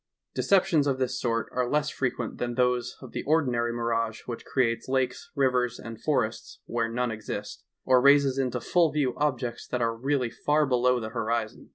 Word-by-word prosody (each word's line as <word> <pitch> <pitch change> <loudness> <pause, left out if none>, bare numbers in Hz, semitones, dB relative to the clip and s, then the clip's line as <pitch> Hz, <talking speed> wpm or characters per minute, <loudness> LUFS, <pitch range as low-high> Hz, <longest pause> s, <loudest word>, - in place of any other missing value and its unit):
Deceptions 170 -7 +3
of 135 -2 +1
this 130 -1 -1
sort 115 -2 0
are 125 -1 -1
less 150 +1 +1
frequent 125 -3 -3
than 120 -1 -2
those 125 -1 +1
of 130 -3 -10
the - - -3
ordinary 125 -6 +1
mirage 115 -1 -1
which 120 -2 -6
creates 115 -3 0
lakes, 130 -1 -1
rivers 125 -3 +1
and 115 -1 -9
forests 120 -7 -1
were 115 -1 -1
none 125 +1 -1
exist, 105 -1 -6 0.2
or 130 -1 +5
raises 140 -1 +5
into 125 -2 0
full 165 +6 +2
view 140 -5 0
objects 130 -5 -2
that 125 - -2
are 115 -1 0
really 130 0 0
far 150 +4 +1
below 125 -1 +2
the 110 -1 -5
hori 115 -1 -1
zon. - - -17
125 Hz, 185 wpm, -27 LUFS, 115-135 Hz, 0.2 s, or